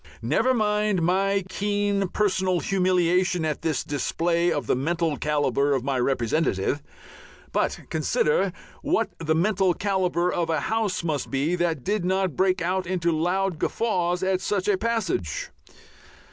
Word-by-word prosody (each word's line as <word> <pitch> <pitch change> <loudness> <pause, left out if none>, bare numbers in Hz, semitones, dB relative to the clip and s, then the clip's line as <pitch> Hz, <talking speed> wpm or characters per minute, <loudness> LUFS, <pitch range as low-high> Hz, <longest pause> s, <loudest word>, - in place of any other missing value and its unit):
Never 155 - +2
mind 210 -4 +1
my 195 +3 +2
keen 205 0 0
personal 190 -2 +1
humiliation 180 -2 +1
at 155 -2 -2
this 155 -4 -1
display 170 +4 0
of 150 -3 -1
the - - +1
mental 165 +3 0
calibre 145 -2 +1
of 130 - -2
my 135 -1 -1
representative, 130 - 0 0.7
but - - -1
consider 475 0 +1 0.3
what - - 0
the 160 -1 0
mental 190 0 +2
calibre 180 -3 0
of 170 -1 -1
a 160 -3 +1
House 220 -3 -1
must 155 -5 -2
be 145 +6 0
that 170 -6 -1
did 205 -2 -1
not 185 -2 0
break 185 -2 +1
out 185 +1 -1
into 175 -2 0
loud 175 +2 0
guffaws 180 -5 0
at 185 0 +1
such 195 0 -1
a 205 - +4
passage. 190 - -2
180 Hz, 145 wpm, -25 LUFS, 160-195 Hz, 0.7 s, a